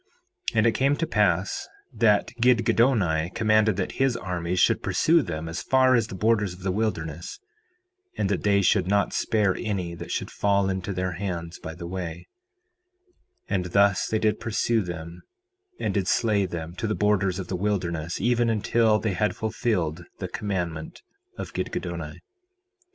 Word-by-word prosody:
4:13 - - -3
And 110 - +4
it 115 - +5
came 135 +4 +2
to 165 - -1
pass 95 - +1 0.3
that 105 -2 +3
Gidgiddoni 115 -8 +3
commanded 110 -1 +3
that - - -2
his 135 -3 +2
armies 90 -3 -2
should - - +3
pursue 165 +1 +3
them 80 - -5
as 80 +2 -4
far 130 -1 +4
as 115 -3 +3
the 95 - -7
borders 105 -2 +1
of 90 - -14
the 95 - 0
wilderness, 85 -6 -3 0.8
and - - +1
that 100 -2 -1
they 100 -1 +3
should 95 -1 +3
not 100 +1 +1
spare 105 -4 +1
any 95 -6 -3
that 85 - -8
should - - -3
fall 100 -1 +1
into 95 +1 -3
their 90 -1 -2
hands 85 -2 -5
by 80 - -7
the 85 - -8
way; 85 -1 -5 1.2
and 95 -3 -1
thus 100 +1 +3
they 110 - 0
did 110 -1 +1
pursue 115 0 +1
them 85 -2 -7 0.6
and - - -1
did 100 -3 0
slay 105 -4 +2
them, 85 -1 -6
to 110 - -2
the 110 - 0
borders 100 -3 +1
of 95 -3 -5
the 95 - -3
wilderness, 85 -4 -2
even 120 -1 +2
until 110 0 +2
they 105 -2 -1
had 105 +4 0
fulfilled 90 -7 -1
the - - -4
commandment 85 -6 -4 0.3
of - - -6
Gidgiddoni. - - -4
100 Hz, 165 wpm, -25 LUFS, 90-110 Hz, 1.2 s, it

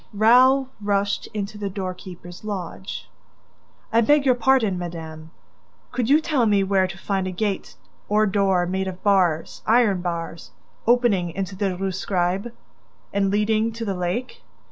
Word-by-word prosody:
Raoul 255 +5 +5
rushed 200 0 0
into 210 0 -5
the 200 -1 -2
doorkeeper's 185 -2 -7
lodge. 190 -2 -6 0.9
"I 230 - +5
beg 290 +4 +4
your 260 - +5
pardon, 245 -6 +2
madame, 160 -2 -7 0.6
could 245 -1 -1
you 295 +2 +6
tell 295 -7 +1
me 200 -2 +3
where 190 -1 +2
to 190 +1 -9
find 190 -1 -2
a - - -3
gate 195 +1 -3 0.3
or 210 +1 +3
door, 195 -3 +2
made 190 +2 -2
of 185 -1 -7
bars, 185 -6 +2
iron 220 -5 +4
bars, 170 -2 -5 0.4
opening 235 -7 +3
into 190 +3 -4
the 190 -2 -1
Rue 195 +1 -2
Scribe... 185 +3 -1 0.6
and 200 -1 +1
leading 215 +2 +1
to 230 0 -5
the 200 - -1
lake? 210 - -3
200 Hz, 150 wpm, -23 LUFS, 185-225 Hz, 0.9 s, you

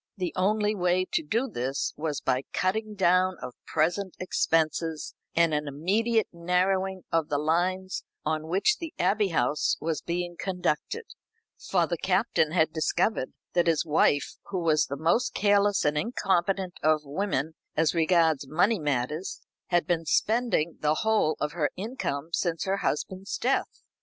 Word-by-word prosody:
The 180 -3 -2
only 210 +3 +2
way 180 -1 +1
to - - +2
do 230 - -1
this 130 - -2
was 150 -3 -3
by 130 - +1
the - - -33
cutting 215 +3 -1
down 185 -1 +3
of 125 - -7
present 175 +4 0
expenses, 160 -3 0 0.2
and 170 -1 +3
an 150 0 -1
immediate 210 +10 +1
narrowing 185 +2 0
of 165 -2 +1
the 145 - +1
lines 180 +5 0 0.2
on 155 0 -1
which 195 - +2
the 330 -2 -7
Abbey 200 +3 +2
House 160 -3 +1
was 160 -1 -2
being 175 0 -3
conducted; 180 - -2 0.7
for 175 -3 +3
the 170 0 -3
Captain 190 -4 +1
had 160 -2 +2
discovered 160 -1 0 0.2
that 175 -1 +2
his 165 0 +2
wife, 150 -2 +2
who 185 -3 -3
was 155 -2 +3
the 140 - -4
most 170 - +1
careless 205 -1 +3
and 150 0 +2
incompetent 190 -4 0
of 155 0 +3
women 160 -1 -2 0.2
as 160 0 +3
regards 160 -4 +2
money 195 +9 +2
matters, 150 +4 -2 0.3
had 175 -1 +2
been 165 -2 0
spending 220 -4 +1
the 150 0 +2
whole 215 -8 +2
of 150 - -1
her 155 -3 0
income 185 - -4
since 165 -2 0
her 195 0 0
husband's 190 +3 -2
death. 260 +3 -1
175 Hz, 155 wpm, -27 LUFS, 155-195 Hz, 0.7 s, down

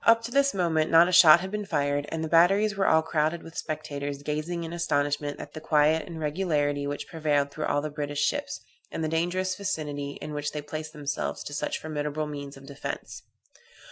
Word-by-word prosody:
Up 230 0 +5
to 235 - -5
this 280 -2 +3
moment 165 -4 +1
not 165 +1 +7
a - - -1
shot 170 -1 +8
had 190 0 -5
been 210 0 -2
fired, 145 -4 0
and 160 0 -3
the - - -2
batteries 195 +6 +4
were 195 0 +1
all 160 0 +4
crowded 160 +1 0
with 165 0 -12
spectators, 145 -2 -4
gazing 155 +4 -3
in 165 +1 -6
astonishment 145 -3 -1
at - - -9
the 155 - -7
quiet 155 +1 +3
and 165 -2 -7
regularity 150 -3 0
which 145 0 -4
prevailed 145 -4 0
through 155 +1 -4
all 145 0 0
the 155 - -3
British 145 -1 -1
ships, - - -2 0.3
and 160 - -3
the - - 0
dangerous 175 +4 0
vicinity 145 -7 -4
in 150 - -6
which 150 0 -3
they 150 - -3
placed 155 +1 -6
themselves 145 -1 -3
to 145 - -7
such 145 - -2
formidable 150 0 -3
means 140 -2 -7
of 135 - -13
defence. 140 0 -6
155 Hz, 205 wpm, -27 LUFS, 145-170 Hz, 0.3 s, shot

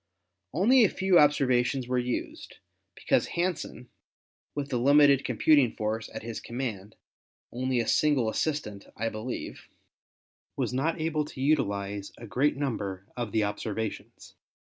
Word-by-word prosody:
Only 230 - +5
a 205 - +4
few 190 -2 +3
observations 130 -3 +2
were 125 0 +1
used, 125 0 -4 0.4
because - - +1
Hansen, 170 -7 -2 0.7
with 145 -1 -3
the 125 -3 -1
limited 140 +1 +5
computing 145 -7 +3
force 110 +1 -3
at - - -7
his 115 -1 -5
command 115 -5 -5 0.3
— - - -72
only 130 0 -1
a 115 - -1
single 145 -6 +2
assistant, 110 -5 -2
I 115 +2 -1
believe 110 +4 -6 0.4
— - - -64
was - - -1
not 155 +6 0
able 155 -1 0
to 145 - -11
utilize 100 -8 -1
a 120 - -9
great 130 +7 +1
number 100 -9 -3
of 120 -4 -4
the 110 0 +1
observations. 105 +1 -5
125 Hz, 145 wpm, -28 LUFS, 110-145 Hz, 0.7 s, Only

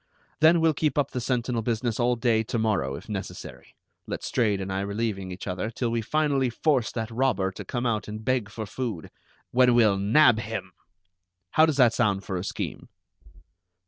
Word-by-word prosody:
Then 160 +2 +5
we'll 160 -1 +4
keep 150 -1 -1
up 140 -2 +1
the 125 - -3
sentinel 125 -1 -1
business 115 +1 -1
all 120 0 +2
day 115 -1 +2
to 115 - -2
morrow, 100 -12 0
if - - -10
necessary, 100 -3 -7 0.3
Letstrayed 105 -5 0
and 95 0 -4
I 95 - -1
relieving 100 -1 -3
each 90 +2 -7
other, 90 +3 -3
till 120 +1 -2
we 115 0 0
finally 140 +1 +1
force 130 0 +1
that 110 -1 -4
robber 115 -6 +1
to - - -8
come 120 0 -3
out 110 -3 -1
and 110 +1 -7
beg 130 -5 0
for 110 +1 -6
food, 110 -6 -5 0.4
when 125 -1 +4
we'll 105 -5 +4
nab 110 +3 +5
him! 105 -4 -5 0.8
How 155 +1 +5
does 155 -3 0
that 120 -4 +5
sound 105 -5 +1
for 95 - -4
a 90 - -3
scheme?" - - -5
115 Hz, 185 wpm, -26 LUFS, 100-125 Hz, 0.8 s, Then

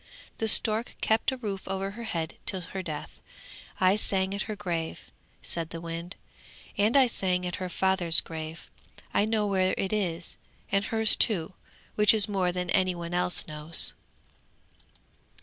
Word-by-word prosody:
The 225 - -1
stork 220 +2 +2
kept 220 +4 0
a 260 - -6
roof 205 -6 -6
over 195 0 -4
her 230 +3 -9
head 165 -6 -4
till 190 -2 +4
her 190 +2 -7
death! 155 -5 -8 0.6
I 185 +1 +3
sang 190 -2 -1
at 200 - -4
her 215 - -4
grave,' 170 -5 -6 0.3
said 165 -1 -2
the 165 - -8
wind, 170 +2 -8 0.6
'and 215 +6 +2
I 270 - +6
sang 185 -6 -2
at 180 - -4
her 185 -1 -5
father's 180 -2 +3
grave. 160 0 -9 0.4
I 205 - +2
know 215 -1 -1
where 190 -2 0
it 195 +1 -3
is, 175 -5 -2 0.3
and 195 +1 0
hers 220 -1 +3
too, 185 -5 +1 0.4
which 210 +1 +4
is 215 0 +1
more 190 -3 -1
than 180 0 -4
any 185 -1 +1
one 170 0 -7
else 180 0 0
knows. 155 +1 +8
190 Hz, 165 wpm, -26 LUFS, 170-210 Hz, 0.6 s, knows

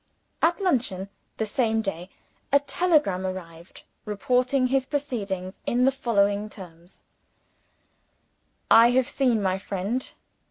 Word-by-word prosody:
At 340 +3 +2
luncheon, 235 - 0 0.3
the 220 - -1
same 225 0 0
day, 180 -2 -5 0.4
a 280 - +6
telegram 285 - +1
arrived, 175 -2 -8 0.2
reporting 250 +5 +1
his 265 +1 +1
proceedings 205 -11 -4
in 245 +1 +2
the 270 - +4
following 205 -5 0
terms: 175 -3 -14 1.7
"I 230 +1 +8
have 255 0 +2
seen 245 -6 +1
my 190 0 0
friend. 200 +6 -3
220 Hz, 115 wpm, -25 LUFS, 190-260 Hz, 1.7 s, I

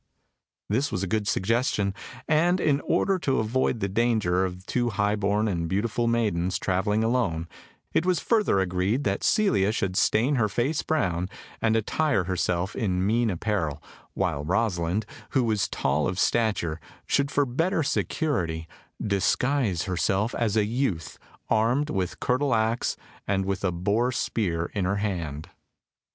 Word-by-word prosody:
This 125 +7 0
was 100 -4 -2
a - - -1
good 105 +2 -1
suggestion, 105 0 +1 0.3
and 170 +4 +3
in 145 -4 +2
order 195 -2 +2
to 135 -5 0
avoid 115 +1 0
the 100 - +1
danger 100 -4 +1
of 90 0 -6
two 120 +1 0
high 105 0 +1
born 105 +1 +1
and 85 -5 -1
beautiful 115 +4 0
maidens 100 -6 +1
travelling 100 +3 0
alone, 115 -9 0 0.5
it - - +3
was 180 -3 +2
further 210 - +2
agreed 95 +7 0
that 100 -1 -1
Celia 185 - +3
should 100 -4 -2
stain 125 +9 +2
her 110 -3 +2
face 130 - 0
brown, 90 - 0 0.3
and 110 -1 +2
attire 115 -1 +1
herself 90 +1 -1
in 95 -3 0
mean 115 +2 +2
apparel, 85 -6 -1 0.4
while 70 - -1
Rosalind, 95 +1 0 0.3
who 130 - +4
was 105 -5 +1
tall - - 0
of 90 - -3
stature, 100 -9 +1 0.3
should 140 0 +1
for 145 0 +2
better 160 +7 0
security, 90 - -1 0.4
disguise 105 - +1
herself 95 +4 0
as 110 -2 0
a 105 - +3
youth, 110 - -2 0.3
armed 120 +7 +2
with 95 -2 -2
curtle 130 0 +1
axe, 110 +2 0 0.3
and 95 -1 +1
with 95 0 -2
a 95 - +2
boar 100 +8 +1
spear 85 -9 -1
in 100 - -1
her 100 +2 +1
hand. 85 -8 -3
105 Hz, 150 wpm, -26 LUFS, 95-120 Hz, 0.5 s, who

